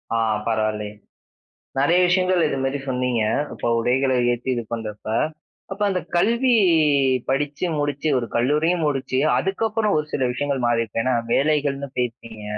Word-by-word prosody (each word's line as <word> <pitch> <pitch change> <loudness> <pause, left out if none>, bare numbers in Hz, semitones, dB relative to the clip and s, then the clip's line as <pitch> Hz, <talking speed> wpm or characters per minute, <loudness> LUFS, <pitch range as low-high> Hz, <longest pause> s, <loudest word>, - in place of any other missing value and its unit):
ஆ - - +2 0.3
பரவால்லையே. 110 -2 -1 0.9
நெறைய 165 +6 +3
விஷயங்கள் 185 -1 +2
இது - - -2
மாரி 135 +2 -1
சொன்னீங்க. 125 -3 0 0.3
இப்ப - - -3
உடைகளை 130 +3 +1 0.2
ஏத்தி 120 +2 -5
இது 120 - -2
பண்ணறப்ப. 110 -2 -5 0.6
அப்ப 195 - -8
அந்த 185 -1 -1 0.2
கல்வி 235 +7 +3 0.8
படிச்சு 145 +5 -1
முடிச்சு, 145 +1 -1
ஒரு 120 - -3
கல்லூரியும் 155 +7 +1
முடிச்சு 135 -2 -1 0.2
அதுக்கப்புறம் 210 - 0
ஒரு 150 - -1
சில 130 - 0
விஷயங்கள் 140 -1 -2
மாறிருக்கும். 115 -2 0
ஏன்னா 130 - +1 0.2
வேலைகள்ன்னு 140 -1 +1
போயிருப்பீங்க, 115 -3 -4
135 Hz, 135 wpm, -22 LUFS, 120-160 Hz, 0.9 s, நெறைய